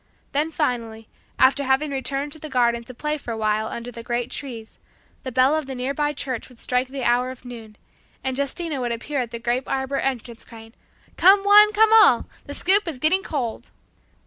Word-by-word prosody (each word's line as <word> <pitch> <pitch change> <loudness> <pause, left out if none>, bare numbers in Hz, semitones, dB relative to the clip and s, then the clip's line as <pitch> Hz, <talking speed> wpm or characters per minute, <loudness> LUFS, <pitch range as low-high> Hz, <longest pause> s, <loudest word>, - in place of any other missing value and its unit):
Then 295 +3 0
finally, 230 -8 -3 0.3
after 270 +2 +4
having 270 +3 +1
returned 275 +1 -3
to 315 - -8
the 310 - -8
garden 235 -3 +1
to 255 - -10
play 300 +3 -3
for 245 - -10
a 225 - -3
while 215 0 0
under 235 +2 -6
the 230 0 -9
great 240 +1 -3
trees, 235 -6 -6 0.4
the 260 - -6
bell 260 +4 +3
of 310 -3 -2
the 265 - -5
nearby 280 +4 -1
church 265 -4 -5
would 250 - -18
strike 250 +2 0
the 265 0 -6
hour 245 +1 +2
of 255 0 -11
noon, 225 -3 -10 0.5
and 265 -1 -2
Justina 280 +1 -2
would 240 -1 -2
appear 270 +5 -3
at 245 -2 -2
the 235 - -6
grape 240 +2 -2
arbor 265 +1 -1
entrance 240 -3 -3
crying, 225 -1 -14 0.4
"Come 390 +2 +6
one, 415 +1 +7
come 440 +1 +4
all! 420 - +6 0.2
The 285 - -6
soup 390 +2 +3
is 320 -5 -4
getting 315 +8 +2
cold!" 255 -11 -4
260 Hz, 200 wpm, -23 LUFS, 240-295 Hz, 0.5 s, one